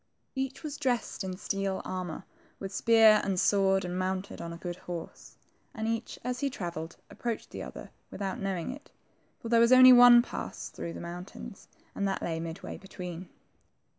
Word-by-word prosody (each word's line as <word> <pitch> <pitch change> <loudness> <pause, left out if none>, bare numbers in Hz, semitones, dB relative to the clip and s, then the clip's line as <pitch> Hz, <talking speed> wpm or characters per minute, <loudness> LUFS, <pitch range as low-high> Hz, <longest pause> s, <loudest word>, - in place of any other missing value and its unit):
Each 265 +2 -4
was 300 -1 -5
dressed 250 -7 -1
in 185 -1 -4
steel 195 -1 -2
armor, 180 -3 -5 0.3
with 195 0 -7
spear 225 0 +6
and 190 -2 0
sword, 195 -1 +3
and 180 +1 -3
mounted 185 +1 -3
on 170 - -5
a 170 - -7
good 175 0 -6
horse; 175 -2 -8 0.4
and 220 0 -3
each, 230 +1 -3
as 250 0 -2
he 280 - 0
travelled, 170 -8 -6
approached 235 -2 -4
the - - -6
other - - -9 0.2
without 195 -2 -4
knowing 195 0 -2
it, 285 +3 -11 0.5
for 230 - -5
there 230 0 +5
was 235 +1 +5
only 255 0 +10
one 245 -1 +9
pass - - -6
through 170 - -6
the - - -7
moun 175 +1 -6
tains, 195 - -11 0.3
and 200 - -1
that 195 - -2
lay 165 -1 -2
midway 165 0 -6
between. 180 -2 -8
195 Hz, 180 wpm, -29 LUFS, 180-235 Hz, 0.5 s, only